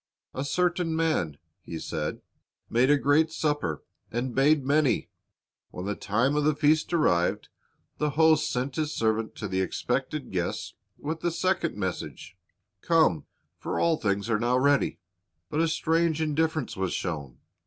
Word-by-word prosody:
"A 130 - -3
certain 175 +2 0
man," 155 - 0 0.2
He 85 - -7
said, 80 -1 -4 0.5
"made 125 +3 +3
a 145 - +6
great 145 +4 +3
supper, 145 - -1 0.3
and 120 +2 -2
bade 140 +1 +3
many." 145 0 +2 0.6
When 90 - -7
the 105 - -1
time 115 +8 0
of 150 - +2
the 155 0 +2
feast 155 +2 +2
arrived, 90 - +1 0.5
the 150 - +1
host 160 +1 +3
sent 125 +1 -2
his 155 -1 0
servant 110 0 0
to 105 - -4
the 95 0 0
expected 95 - -2
guests - - -3 0.2
with 155 +2 -5
a 175 - +2
second 170 - 0
message, 95 -2 -5 0.5
"Come; 160 - +3 0.3
for - - -3
all 170 -1 +3
things 100 -3 -1
are 115 -2 +1
now 120 +2 +2
ready." 140 +2 +2 0.5
But 150 - 0
a 165 - +3
strange 160 0 +1
indifference 155 -2 0
was 95 -1 -2
shown. 70 -8 -4
145 Hz, 155 wpm, -27 LUFS, 105-160 Hz, 0.6 s, a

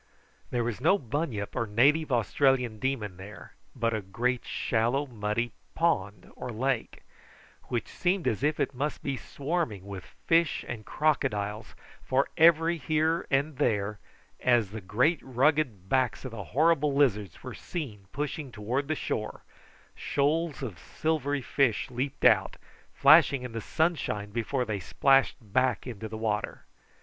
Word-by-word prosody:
There 120 -1 0
was 120 0 -3
no 195 - +4
bunyip 125 - -3
or 115 - -1
native 140 +8 +3
Australian 125 -1 +2
demon 110 -8 -2
there, 100 +3 -11 0.2
but 115 -2 0
a 110 - -1
great 120 +6 -1
shallow, 120 +5 0
muddy 115 -1 -2 0.2
pond 105 - 0
or - - -6
lake, 125 +2 -2 0.6
which 120 -2 -2
seemed 180 0 -1
as 110 - 0
if 150 +1 +1
it - - 0
must 140 +4 -3
be 140 -1 -1
swarming 135 - -3
with 100 -2 -9
fish 165 -1 +2
and 110 -3 -6
crocodiles, 105 -8 -1 0.3
for 135 +2 +1
every 165 +1 +5
here 155 +4 0
and 140 +1 0
there, 105 -3 0 0.4
as 120 -6 +2
the 110 0 -6
great 125 - +2
rugged 130 - +1
backs 130 0 0
of 130 - -5
the 105 -4 -7
horrible 150 - +2
lizards 105 - +1
were - - -6
seen 110 - -6
pushing 145 -1 -4
towards 120 +6 -2
the 155 - 0
shore, 110 -6 -4 0.5
shoals 150 +1 0
of 105 -9 -6
silvery 145 -3 -1
fish 130 -5 +1
leaped 130 +3 -3
out, 105 -6 +5 0.4
flashing 135 -3 +6
in 125 - -6
the 115 0 -4
sunshine 145 -12 -1
before 120 +3 -1
they 105 -3 -2
splashed 135 - +3
back 125 +1 0
into 115 -3 -6
the 110 - -6
water. 110 -2 -2
125 Hz, 145 wpm, -28 LUFS, 110-145 Hz, 0.6 s, flashing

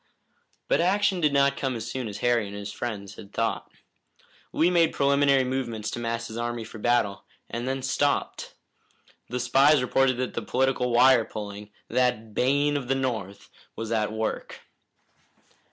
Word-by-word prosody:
But - - +2
action 190 +1 +2
did 150 -2 +3
not 140 0 +3
come 135 -3 -2
as 115 -1 -5
soon 130 -2 -3
as 100 - -6
Harry 120 -3 +2
and 100 - -8
his 100 0 -6
friends 105 -4 -5
had 100 - -12
thought. 115 +1 -2 0.8
Lee 170 +3 +2
made 170 -2 +3
preliminary 140 -1 +3
movements 125 -4 -3
to - - -4
mass 115 0 -3
his 110 - -8
army 120 -1 -3
for 110 0 -10
battle, 110 -4 +1 0.3
and 120 +2 -3
then 135 0 -2
stopped. 140 +2 -1 0.7
The 125 - -3
spies 135 +4 +4
reported 130 0 +2
that 130 0 -3
political 130 -1 +1
wire 125 0 +6
pulling, 105 -1 -7 0.2
that 125 -4 0
bane 145 +5 +2
of 130 -3 -5
the 135 - +1
North, 110 -7 -4 0.2
was 115 0 -5
at 110 -2 0
work. 110 0 -4
125 Hz, 160 wpm, -26 LUFS, 110-135 Hz, 0.8 s, wire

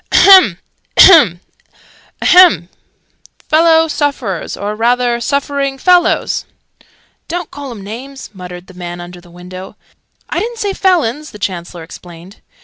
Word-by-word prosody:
"Ahem! 370 - +6 0.4
Ahem! 240 - +6 0.8
Ahem! 350 - +5 0.8
Fellow 325 +1 +3
sufferers, 275 - -3
or 205 +1 -4
rather 240 +2 0
suffering 280 +1 -2
fellows 355 +4 +1 0.4
" - - -37
("Don't 350 0 -5
call 285 -1 -8
'em 220 -5 -10
names!" 260 +7 -10
muttered 180 -2 -10
the 185 - -16
man 175 -1 -8
under 175 0 -11
the 175 - -19
window. 180 +2 -11 0.5
"I - - -3
didn't 470 +1 -5
say 410 -3 -3
felons!" 305 -7 0
the - - -12
Chancellor 175 -3 -6
explained.) 175 +3 -14
235 Hz, 130 wpm, -14 LUFS, -, 0.8 s, Ahem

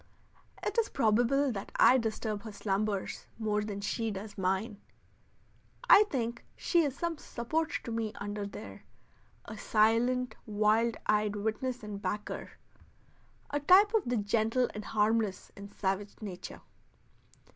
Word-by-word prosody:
It - - +1
is 445 - +1
probable 245 +3 +2
that 200 -4 -6
I 260 - +6
disturb 220 -2 -2
her 220 - -8
slumbers 200 0 -2
more 210 -2 0
than 205 -1 -5
she 225 +3 -1
does 205 0 -6
mine. 195 +3 -1 1.1
I 420 - +8
think 235 -3 -2
she 345 - +2
is 280 -3 -2
some 340 -3 -2
support 310 +7 -2
to 235 - -6
me 225 -1 -2
under 205 0 -4
there - - -9 0.6
a 220 - -8
silent 230 +3 +2
wild 215 +2 +2
eyed 210 0 +2
witness 220 +4 -2
and 205 -1 -6
backer; 205 +2 -4 1.0
a 290 - 0
type 380 +8 +6
of 445 - +2
the 245 0 +1
gentle 225 +4 +1
and 210 - -6
harmless 215 -2 0
in 200 0 -9
savage 200 0 -2
nature. 195 -5 -7
220 Hz, 135 wpm, -31 LUFS, 205-245 Hz, 1.1 s, I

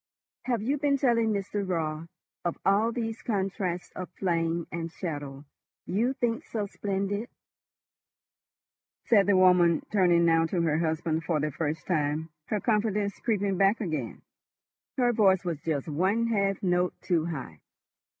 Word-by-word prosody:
"Have 240 -4 0
you 275 +5 0
been 285 -1 +2
telling 235 -4 +2
Mr. 200 0 -2
Raut 165 -3 -2 0.4
of 175 -1 -2
all 205 +4 +3
these 225 -1 -4
contrasts 190 -4 -2
of 185 - -7
flame 170 -2 0
and 165 0 -4
shadow 145 -5 -6 0.4
you 230 +8 0
think 240 -4 -1
so 215 -3 -3
splendid?" 200 +2 -3 1.8
said 205 -4 +4
the 200 -2 +4
woman, 180 -3 +5
turning 175 -4 +4
now 165 0 +4
to 170 0 0
her 155 -1 +1
husband 160 0 -1
for 155 0 0
the 150 +1 -1
first 155 +2 -3
time, 155 -1 -1 0.2
her 210 - -1
confidence 210 -2 0
creeping 200 -4 0
back 195 +3 +3
again, 155 - -4 0.7
her 245 -2 +3
voice 195 -4 +3 0.2
just 150 -3 -2
one 190 +9 +1
half 200 -4 0
note 180 -1 +1
too 165 -3 +1
high. 130 - -6
185 Hz, 140 wpm, -28 LUFS, 165-210 Hz, 1.8 s, woman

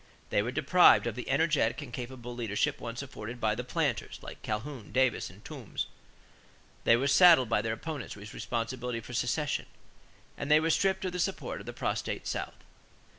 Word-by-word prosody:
They - - +3
were 110 - -2
deprived 165 +3 +6
of 120 - -1
the 125 - -6
energetic 140 -4 +2
and 120 -4 -11
capable 125 -1 -6
leadership 120 +5 -1
once 115 +3 -5
afforded 120 -2 -7
by 110 -2 +2
the 120 +3 -3
planters, 125 - -1
like - - -9
Calhoun, 110 +1 -5
Davis, 130 0 +2
and - - -16
Toombs; - - -5 1.0
they 115 - +7
were 125 +4 0
saddled 140 -3 +7
by 115 - +2
their 110 -1 -1
opponents 145 +2 -5
with 105 +1 -10
responsibility 120 +1 -3
for 125 - -10
secession; 130 +5 -1 0.7
and 140 - -3
they 150 +1 +7
were 165 +1 +1
stripped 190 +2 +1
of 185 - -1
the 180 - -4
support 190 +2 -2
of - - -11
the - - -3
prostrate - - -2
South. - - -4
125 Hz, 180 wpm, -30 LUFS, 115-150 Hz, 1.0 s, they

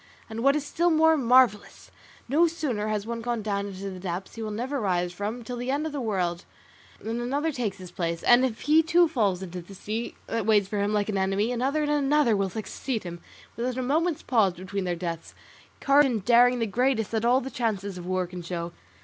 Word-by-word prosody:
And 220 - -5
what 275 +1 +5
is 300 -1 -2
still 340 +4 +1
more 320 0 +5
marvellous, 250 -6 +2 0.4
no 310 +7 +4
sooner 275 -11 -2
has 210 -1 -2
one 230 0 -4
gone 235 -2 -2
down 200 -1 -2
into 195 0 -6
the 185 - -8
depths 180 0 -5
he 225 - -8
will 215 - -3
never 250 +6 -3
rise 180 -3 0
from 210 +6 -4
till 245 +1 -6
the 245 +1 -4
end 285 +3 0
of 315 - -3
the 285 -2 -4
world, 180 -6 -1 0.6
than 230 +2 -4
another 285 +6 -1
takes 225 -8 -3
his 185 -2 -10
place; 170 -1 -3
and 245 +1 +6
if 240 -4 -2
he 310 +2 +5
too 335 +2 +4
falls 205 - 0
into 180 -1 -6
the 195 +3 -13
sea 220 +5 -4
that 225 -2 -3
waits 205 -3 +4
for 205 +1 -3
him 205 +1 0
like 210 -1 0
an 200 -2 0
enemy, 195 +4 0
another 270 +5 0
and 295 - 0
another 290 -4 +3
will 195 -1 0
succeed 220 +4 -4
him 175 -1 -7 0.4
without 250 +2 -3
a 255 - -1
moment's 315 +5 0
pause 215 -7 +2
between 185 +2 -5
their 175 -1 -1
deaths: 170 -1 -6 0.4
courage 280 +1 +5
and 220 -6 -2
daring 245 +1 +5
the 230 - 0
greatest 230 0 0
that 220 -1 -1
all 245 +2 +4
the 265 +1 -6
chances 200 -5 -2
of 175 - -8
war 185 0 0
can 180 0 -8
show. 170 0 -5
225 Hz, 225 wpm, -26 LUFS, 195-260 Hz, 0.6 s, and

